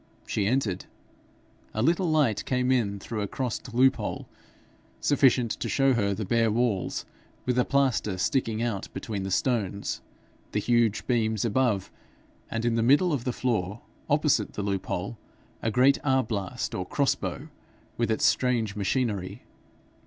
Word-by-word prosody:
She 100 -2 0
entered. 110 -6 0 0.9
A 110 - +1
little 170 +4 +2
light 145 -9 +2
came 125 0 +1
in 110 -6 +1
through 110 +2 -4
a 100 - -1
crossed 125 +2 -4
loophole, 130 +3 +1 0.7
sufficient 130 -5 +3
to - - -3
show 135 -1 +3
her 100 -4 +1
the 105 +1 -3
bare 115 +3 +2
walls, 110 -3 0 0.4
with 125 - +1
the 125 - +3
plaster 130 -8 +1
sticking 115 +1 0
out 110 -5 -2
between 110 -7 -4
the 95 - -3
stones, 100 -2 -1 0.5
the 105 - +1
huge 110 -4 +2
beams 110 -3 +1
above, 115 -3 +1 0.6
and 115 +1 -2
in 120 - +2
the 115 - +1
middle 145 +9 +4
of 130 -5 -2
the 125 - +1
floor, 110 -4 -1 0.3
opposite - - +2
the 105 - -3
loop 100 -2 -2
hole, - - -3 0.4
a 110 - 0
great 130 +5 +4
arblast 115 -9 -1
or 90 - -2
crossbow, 140 - -1 0.5
with 115 -1 0
its 110 - +1
strange 120 -5 +2
machinery. 100 -3 -1
115 Hz, 150 wpm, -27 LUFS, 105-130 Hz, 0.9 s, middle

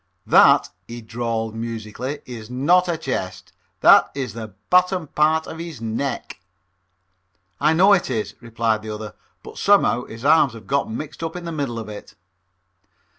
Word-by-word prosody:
"That," - - +5 0.2
he 120 +1 -7
drawled 115 -1 -3
musically, 115 +5 -5
"ees 115 -3 -9
not 170 +9 +3
a 170 - 0
chest. 95 - -5 0.3
That - - +7
ees 130 -6 -4
the 110 -3 -8 0.2
bottom 180 -1 +3
part 155 +2 +1
of 160 - -8
hees 170 -6 -7
neck." 115 +5 -4 1.2
"I 150 +2 +3
know 190 +5 +5
it 185 -7 +1
is," 110 -4 -3
replied 115 -2 -1
the 110 - -8
other, 105 0 -6 0.3
"but - - -10
somehow 200 - +3
his 115 +3 -10
arms 150 -4 +5
have 115 -2 -12
gotten 140 -5 -1
mixed 155 +1 -8
up 165 0 -4
in 180 -1 -6
the 170 - -4
middle 140 -7 -3
of 110 - -6
it." 105 -1 -10
125 Hz, 165 wpm, -22 LUFS, 110-160 Hz, 1.2 s, That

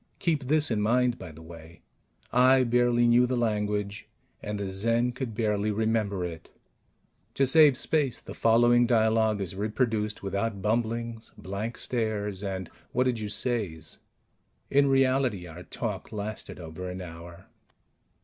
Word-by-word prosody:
Keep 155 -6 0
this 155 +1 +2
in 105 -2 +1
mind, 120 +3 +2
by 90 -3 -8
the 80 +1 -13
way: 80 0 -13 0.5
I 130 +1 +5
barely 120 0 +3
knew 120 +1 +5
the 125 0 -1
language, 105 -3 -2 0.3
and 105 0 -4
the 100 -1 -3
Zen 115 +5 +1
could 125 -3 -5
barely 105 -1 0
remember 105 -3 0
it. 85 -1 -8 0.9
To 135 - +3
save 145 0 +6
space, 140 -6 0
the - - -10
following 120 +1 +4
dialogue 110 -2 +2
is 95 -2 -3
reproduced 105 +1 -1
without 100 +2 -2
bumblings, 115 +2 -2
blank 100 +5 -5
stares 105 -5 -2
and 95 -3 -4 0.3
What 125 - +3
did 125 -3 0
you 105 -1 -4
says? 100 -8 -3 0.7
In 140 0 +4
reality, 130 -7 +2
our 85 +1 -10
talk - - -5
lasted 105 -1 -6
over 85 +2 -7
an 90 +1 -6
hour. 85 -1 -10
110 Hz, 145 wpm, -27 LUFS, 100-120 Hz, 0.9 s, save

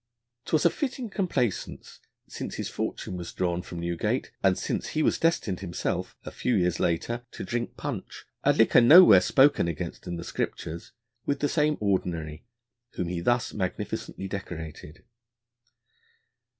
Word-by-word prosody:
'Twas 155 0 +1
a 170 - +6
fitting 255 -5 -4
complaisance, 175 - -2 0.3
since - - -6
his - - -4
fortune 90 - -4
was 85 -1 -6
drawn 90 -1 -1
from 90 -1 -8
Newgate, 85 0 -1
and - - +3
since - - -2
he 155 - +3
was - - +2
destined 140 - +1
himself, 90 -3 -3
a - - -6
few 125 - 0
years 90 -2 +1
later, 115 +8 -1
to - - -7
drink 120 0 -3
punch - - -6 0.2
'a - - +5
liquor - - +5
nowhere 120 - +9
spoken 135 +1 +4
against 85 +1 -5
in 85 - -3
the 85 - -6
Scriptures' 85 -1 -4 0.4
with 140 -1 0
the 145 - +1
same 150 -1 +1
Ordinary 85 -6 -1 0.5
whom 90 - -3
he 90 -1 -2
thus 120 +6 +1
magnificently 95 0 -4
decorated. 80 -5 -7
95 Hz, 150 wpm, -27 LUFS, 85-140 Hz, 0.5 s, nowhere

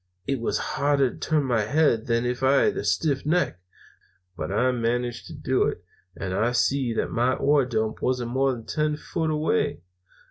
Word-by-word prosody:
It 135 -2 -1
was 115 - 0
harder 140 -2 +1
to - - -12
turn 155 -2 +1
my 120 -4 +1
head 115 0 +2
than 115 0 +1
if 125 +1 -2
I'd 135 +1 +4
had - - -5
a - - -2
stiff 135 - 0
neck; 160 - 0 0.8
but 95 - -4
I 125 +6 +2
managed 120 0 -2
to - - -9
do - - 0
it, - - -4 0.3
and 95 -1 -4
I 110 +6 +1
see 130 0 +1
that - - -1
my 125 +2 +2
ore 145 -1 +3
dump 110 -3 -2
wasn't 125 -2 -1
more 135 +1 +2
than 115 -3 -6
ten 150 -1 0
foot 160 +1 -3
away. 150 - 0
125 Hz, 190 wpm, -25 LUFS, 115-140 Hz, 0.8 s, I'd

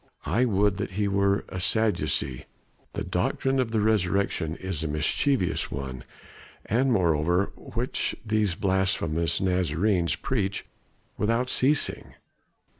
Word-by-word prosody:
I 125 +4 +2
would 100 -3 +2
that 95 - -4
he 105 -1 +1
were 100 0 +1
a 90 - -5
Sadducee, 95 - 0 0.5
the - - -3
doctrine 135 0 0
of 125 -3 +1
the 110 -1 0
resurrection 100 -5 +1
is 95 -5 -4
a - - -1
mischievous 90 - +1
one, 65 -2 -6 0.6
and 125 +6 +1
one - - +4
moreover 85 +4 +2
which 120 +2 -2
these 105 -4 +1
blasphemous 90 -4 +1
Nazarenes 90 0 +1
preach 100 -7 -2 0.5
without 115 +4 +1
ceasing. 145 +3 +1
100 Hz, 120 wpm, -26 LUFS, 85-110 Hz, 0.6 s, one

